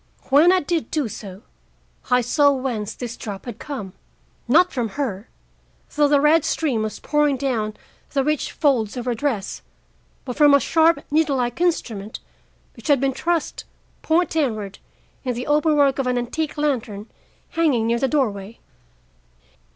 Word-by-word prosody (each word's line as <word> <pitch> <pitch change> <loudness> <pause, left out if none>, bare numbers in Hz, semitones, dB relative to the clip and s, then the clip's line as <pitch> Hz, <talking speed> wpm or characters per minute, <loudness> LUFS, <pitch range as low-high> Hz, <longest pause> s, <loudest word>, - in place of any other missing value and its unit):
When 305 +6 +6
I 370 0 +3
did 330 +1 -2
do 300 -6 -1
so, 200 -1 -9 0.7
I 250 0 +4
saw 285 +4 +3
whence 250 -6 -3
this 240 -1 -6
drop 200 -5 -7
had 240 -4 -7
come. 230 -11 -6 0.5
Not 340 +9 +4
from 240 -3 -1
her, 220 -7 -3 0.7
though 295 0 +4
the 285 0 +4
red 300 +2 +4
stream 270 -9 0
was 215 0 -3
pouring 295 -2 +1
down 225 -6 -2 0.4
the 275 -2 +2
rich 300 0 -1
folds 255 -8 +1
of 245 - -4
her 245 - 0
dress, 230 -5 -3 0.6
but 250 -2 -5
from 290 -1 +6
a - - +5
sharp 325 0 +3
needle 300 -2 +2
like 245 +6 -2
instrument 225 - -1 0.6
which - - -11
had 285 -3 +4
been 270 0 0
thrust, 335 +3 -2 0.4
point 340 +3 +1
downward, 220 -11 -2 0.4
in 250 -3 -2
the 245 - -4
open 300 +1 +2
work 280 -2 +3
of 265 - 0
an 250 0 +1
antique 295 +6 -3
lantern 245 -8 -2 0.4
hanging 300 -9 +1
near 235 +1 +1
the 270 - +1
doorway. 225 -7 -1
270 Hz, 160 wpm, -22 LUFS, 230-300 Hz, 0.7 s, When